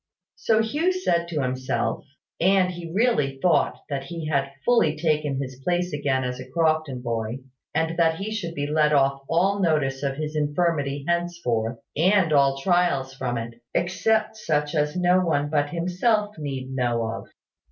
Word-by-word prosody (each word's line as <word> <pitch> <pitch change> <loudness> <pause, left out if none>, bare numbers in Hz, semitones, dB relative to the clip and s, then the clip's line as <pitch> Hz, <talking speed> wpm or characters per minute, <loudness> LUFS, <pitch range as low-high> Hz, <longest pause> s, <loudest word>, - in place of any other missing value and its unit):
So 220 -1 +2
Hugh 305 +11 +1
said 175 - 0
to 155 -5 -2
himself; 130 0 -2 0.4
and 185 0 +3
he 170 -2 -7
really 175 - +1
thought 170 +1 +2
that 135 -2 -3
he 165 -1 -6
had 140 -2 0
fully 195 -11 +3
taken 150 -3 0
his 130 -1 -6
place 180 0 0
again 140 -3 0
as 125 0 -3
a 130 0 -9
Crofton 155 -4 0
boy, 115 +1 -3 0.3
and 160 +1 0
that 165 -1 +4
he 195 +5 -5
should 170 -6 -4
be 145 - -2
let 150 0 +2
off 135 -1 +2
all 190 +4 +2
notice 150 -7 +1
of 140 -1 -1
his 155 +1 -4
infirmity 145 -2 0
henceforth, 170 -10 -1 0.2
and 180 0 +3
all 140 -1 +4
trials 155 -5 +1
from 125 -2 -3
it, 115 +1 -7
except 215 +5 +1
such 150 -7 -1
as 150 0 0
no 180 0 +4
one 145 -4 0
but 145 -1 +1
himself 205 +6 0
need 135 -3 -5
know 120 -3 0
of. 110 0 -5
155 Hz, 165 wpm, -24 LUFS, 135-175 Hz, 0.4 s, that